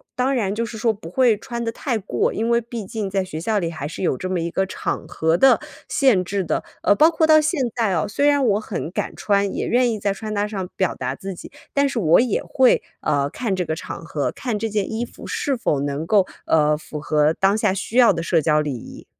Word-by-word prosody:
当 260 +2 +1
然 200 -5 0
就 230 +2 -1
是 225 0 -7
说 225 +1 +2
不 195 -6 -10
会 235 +1 +3
穿 235 +1 -5
得 230 - -2
太 240 -1 -2
过， 200 - -1
因 225 +2 -1
为 235 0 +4
毕 230 -3 -6
竟 210 -1 -4
在 195 -1 0
学 160 -4 -6
校 210 +6 0
里 170 -2 -2
还 145 -3 -5
是 165 - -6
有 150 - +1
这 185 - -4
么 185 -1 0
一 170 0 -3
个 190 - 0
场 190 - -4
合 160 +1 +1
的 270 - +5 0.3
限 250 -10 +3
制 195 +2 -1
的。 170 - -1 0.2
呃， - - +5
包 315 +7 +6
括 325 -1 +2
到 310 0 +7
现 310 0 0 0.2
在 225 -5 +1
哦， 165 - +1
虽 285 +8 +1
然 285 -2 +3
我 205 -2 +3
很 200 -6 -5
敢 - - -3
穿， 200 -1 +1
也 - - -2
愿 245 0 +2
意 215 - -3
在 200 -1 0
穿 215 +1 -6
搭 205 0 0
上 195 -4 -4
表 190 -2 0
达 130 +1 -3
自 195 +5 -6
己， - - -11 0.2
但 280 0 +3
是 260 - -5
我 165 -4 +5
也 235 -4 +1
会， 260 -2 +3 0.2
呃， 145 -2 0
看 210 - -2
这 180 -1 -2
个 160 - -2
场 160 - -7
合， 150 -3 -2
看 240 -5 -3
这 225 - -1
件 210 0 -1
衣 225 +2 -2
服 - - -13
是 280 -2 -1
否 150 -10 0
能 145 +2 -2
够， 195 +1 +3 0.2
呃， 150 -1 +3
符 150 0 -8
合 150 +1 +2
当 195 +4 +2
下 210 -4 +1
需 205 +5 -4
要 245 -2 +7
的 165 - -3
社 165 0 +2
交 150 0 +2
礼 145 -3 -2
仪。 120 - -10
200 Hz, 275 characters per minute, -22 LUFS, 165-235 Hz, 0.3 s, 到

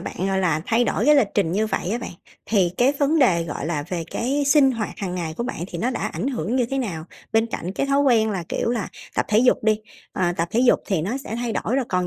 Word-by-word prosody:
bạn, - - -6
gọi 190 - +1
là, 180 -4 +1
thay 235 +2 +2
đổi 225 - 0
cái 300 - +7
lịch 255 -8 +4
trình 185 -5 +1
như 215 +3 +1
vậy 195 -3 -2
á 235 - 0
bạn, 235 - -6 0.4
thì 195 -5 +2
cái 255 +3 +4
vấn 300 +3 +2
đề, 185 -11 +4
gọi 150 -2 -5
là, 155 -3 -1
về 175 -3 -3
cái 275 +4 -1
sinh 280 -2 +5
hoạt 225 -3 -3
hằng 185 -3 -3
ngày 165 -3 -3
của - - -2
bạn 245 - -5
thì - - -6
nó 245 +3 0
đã 245 - -4
ảnh 265 - -3
hưởng 235 - -2
như 245 - +2
thế 270 +3 -2
nào? 175 -11 -3 0.3
Bên 225 +1 +3
cạnh 185 -5 -5
cái 275 - -1
thói 275 0 +2
quen 230 -6 +3
là, 185 -4 -3
kiểu - - -1
là, 235 -4 -2 0.3
tập - - 0
thể 210 - +3
dục 250 +2 +4
đi, 215 0 +2 0.3
ờ, 175 -2 0
tập 170 +1 -1
thể 230 - +1
dục 250 -1 +5
thì 190 -6 0
nó 215 +9 -2
sẽ 225 -4 -6
thay 240 -1 -2
đổi 245 - 0
rồi, 270 - +1
còn 180 -1 0
220 Hz, 285 wpm, -23 LUFS, 180-250 Hz, 0.4 s, cái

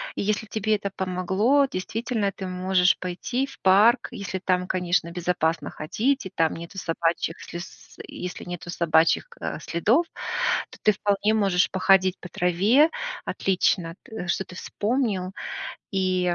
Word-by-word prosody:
И - - -2
если 215 +2 0
тебе 215 +1 0
это 200 -1 -3
помогло, 190 +9 +2
действительно, 220 +3 -2
ты 190 0 -6
можешь 185 0 +2
пойти 215 +9 -2
в - - -13
парк, 215 +6 +5
если 190 -1 -4
там, 180 -1 0
конечно, 175 -2 0
безопасно 170 -3 -1
ходить 245 - -1
и - - -5
там 165 -1 +2
нету 170 +3 -9
собачьих 165 -1 -1
слиз 170 +2 -10
и - - -9
если 180 - -6
нету 175 0 -7
собачьих 165 - +3
ка 475 - -5
следов, 225 - +2 0.7
то - - -13
ты 215 - +6
вполне 205 +2 +1
можешь 195 -4 +3
походить 190 0 +3
по 180 - -9
траве. 200 - +3 0.4
Отлично, 180 -3 0
т 220 -8 -7
что 185 +2 0
ты 180 - -12
вспомнил. 205 -4 -1 0.6
И, 185 -2 +1
185 Hz, 145 wpm, -25 LUFS, 180-215 Hz, 0.7 s, ты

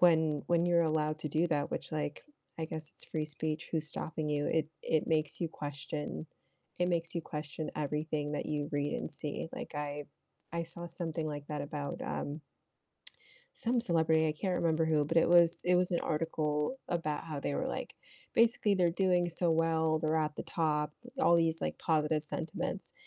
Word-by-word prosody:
when 160 -4 +4
when 170 0 +3
you're 175 -1 +4
allowed 155 -1 +1
to 155 - -2
do 160 +4 +2
that 145 -3 0
which, - - -4
like, 150 -1 -3 0.3
I 160 - -1
guess 155 -1 -5
it's - - -2
free 155 -1 -2
speech, 155 +1 -3
who's 155 -2 +1
stopping 155 0 -1
you? 145 0 0
It 160 -2 +1
it 160 -1 +1
makes 155 -2 +1
you 170 - 0
question 150 +1 -5 0.5
it 180 - +2
makes 170 0 0
you 170 - 0
question 150 0 -5
everything 150 0 -1
that 150 - -2
you 150 -1 -1
read 145 0 0
and - - -3
see. 150 +2 -3
Like, - - -6
I 145 0 -3 0.5
I 170 0 0
saw 170 +1 -6
something 165 -2 -3
like 145 -1 -4
that 150 -1 -2
about, 145 0 -4
um 145 +2 -3 1.2
some 240 +1 +2
celebrity, 160 -5 +3
I - - +1
can't 180 +4 -1
remember 160 -1 +2
who, 155 -2 +3
but, - - -1
it 165 - +6
was 170 -1 +6
it 180 0 +5
was 180 0 +3
an 175 - +2
article 150 - 0
about 165 -4 -1
how 155 -3 -4
they 140 - -1
were, 260 - 0
like, 265 - -4 0.4
basically 230 -3 +4
they're 180 -3 +3
doing 180 -1 +2
so 170 +1 +2
well, 160 -1 +3
they're 155 0 +1
at 155 -1 -1
the - - -3
top 150 -2 0 0.3
all 170 -10 +6
these, 165 -1 +2
like, - - -2
positive 155 -1 +2
sentiments, 155 +1 -3
160 Hz, 190 wpm, -33 LUFS, 150-170 Hz, 1.2 s, it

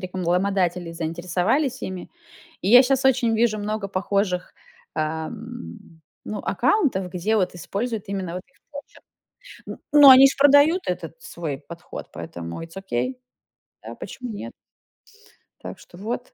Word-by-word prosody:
рекламодатели 180 -1 -1
заинтересовались 180 - -1
ими. 185 -1 -6 0.5
И 185 - -2
я 245 +2 +10
щас 265 0 +1
очень 245 -3 +3
вижу 220 -2 +2
много 210 0 -3
похожих, 190 -1 -1 0.4
а, 155 0 -2
м, 230 -6 -10 0.2
ну, 210 - -5
аккаунтов, 250 - +1
где 205 +5 0
вот 185 -3 0
используют 210 +4 -4
именно 190 -3 -3
вот 180 - -5
их - - -33 0.2
почерк. 285 0 -11 0.6
Н - - -7 0.2
но 280 - +11
они 265 +1 +9
ж - - -4
продают 285 +5 +6
этот - - -5
свой 165 - -5
подход, 170 +4 -10
поэтому 85 - -7
it's 165 +2 -11
Okey. 125 -9 -2 0.7
Да, 115 +2 -8
почему 250 +5 -7
нет? 115 - -7 1.1
Так - - -8
что 175 - -16
вот. 235 +5 -5
195 Hz, 140 wpm, -23 LUFS, 175-245 Hz, 1.1 s, но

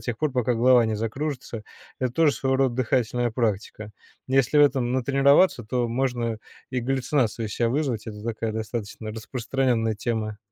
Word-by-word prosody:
тех 120 -2 -3
пор, 155 -3 0
пока 125 -1 +1
голова 120 +1 +5
не 110 -1 -1
закружится. 125 0 -4 0.4
Это 130 -1 0
тоже 155 +1 +3
своего 130 0 0
рода 130 -3 +1
дыхательная 120 -1 0
практика. 110 -2 -2 0.4
Если 135 +2 +2
в - - +8
этом 130 -4 +1
натренироваться, 135 +4 +3
то 125 +2 -1
можно 120 -2 -1 0.3
и 130 - -1
галлюцинацию 125 -3 0
из 105 - -6
ся 120 - +1
вызвать. 125 -4 -1
Это 105 -1 -8
такая 115 0 -3
достаточно 110 0 -5
распространенная 115 0 -1
тема. 110 -1 -3
120 Hz, 160 wpm, -25 LUFS, 110-130 Hz, 0.4 s, в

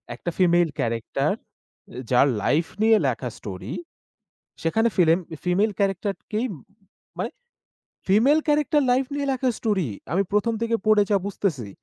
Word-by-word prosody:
একটা 150 - -5
female 175 -2 +4
character. 115 -1 -1 0.6
এ - - -7
যার 125 +3 +5 0.2
life 160 +3 +2 0.2
নিয়ে 220 0 +6
লেখা 125 0 -2
স্টোরি। 95 -3 -7 0.9
সেখানে 225 +8 +2
ফিলেম 170 -2 +4 0.3
ফিমেল 195 +5 +2
ক্যারাক্টারকেই 200 +3 -1 0.7
মানে - - -2 0.8
ফিমেল 235 +11 +4
ক্যারাক্টার 295 0 +3
লাইফ 260 +1 +2
নিয়ে 285 -1 -2
লেখা 260 0 0
স্টোরি। 195 - 0 0.2
আমি 195 +2 +3
১ম 225 +2 +2
থেকে 230 0 +1
পড়ে 215 -1 +6
যা 200 - +5
বুঝতেছি, 160 - -2
200 Hz, 130 wpm, -24 LUFS, 165-230 Hz, 0.9 s, নিয়ে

